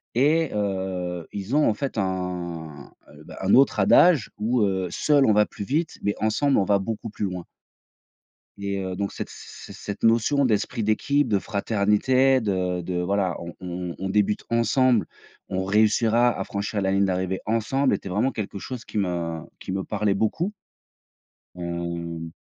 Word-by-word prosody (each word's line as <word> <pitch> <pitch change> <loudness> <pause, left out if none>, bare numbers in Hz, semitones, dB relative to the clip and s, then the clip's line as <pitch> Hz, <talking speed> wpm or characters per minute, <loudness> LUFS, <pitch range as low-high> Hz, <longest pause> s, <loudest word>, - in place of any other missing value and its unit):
et 155 +5 +3
heu, 95 -4 -2
ils 100 +6 -3
ont, 150 -4 +4
en 110 - 0
fait, 135 -2 -3
un 90 -5 -4 0.2
heu, 75 +1 -14
bah, - - -11
un 95 +1 +1
autre 130 -5 +5
adage 145 - +5
où, 115 +3 +1
heu: 95 -2 0
«Seul, 145 - +3
on 110 - +5
va 105 0 +4
plus - - -8
vite, 150 - -1
mais 100 - 0
ensemble, 130 +6 +2
on - - +3
va 100 0 +3
beaucoup 110 +2 -4
plus 105 - -3
loin». 90 -2 -5 1.1
Et 100 0 -2
heu, 95 -1 -4
donc 100 +1 -2
cette - - -5
c - - -11 0.3
c'est - - -10
cette 100 -1 -7
notion 115 +5 +3
d'esprit 110 0 0
d'équipe, 140 +7 +1
de 105 -3 +2
fraternité, 110 +7 +2
de 90 -3 -1
de, 90 +1 -4
voilà: 95 0 0
«On 85 0 -7
on 90 -1 -5
on 95 - -3
débute 105 +1 +1
ensemble, 115 -2 +3 0.4
on 95 0 -1
réussira 110 +4 +3
à 100 - -2
franchir 100 +1 -3
la 95 0 +1
ligne 100 0 +3
d'arrivée 95 0 -1
ensemble» 115 +5 +1
était 100 - -3
vraiment 105 +9 +1
quelque 105 -4 -5
chose 125 +4 -6
qui - - -7
me 85 -4 -1 0.2
qui - - -6
me 95 0 -2
parlait 105 -1 0
beaucoup. 165 - -1 1.0
Hem, 85 -1 -4
100 Hz, 175 wpm, -24 LUFS, 90-115 Hz, 1.1 s, autre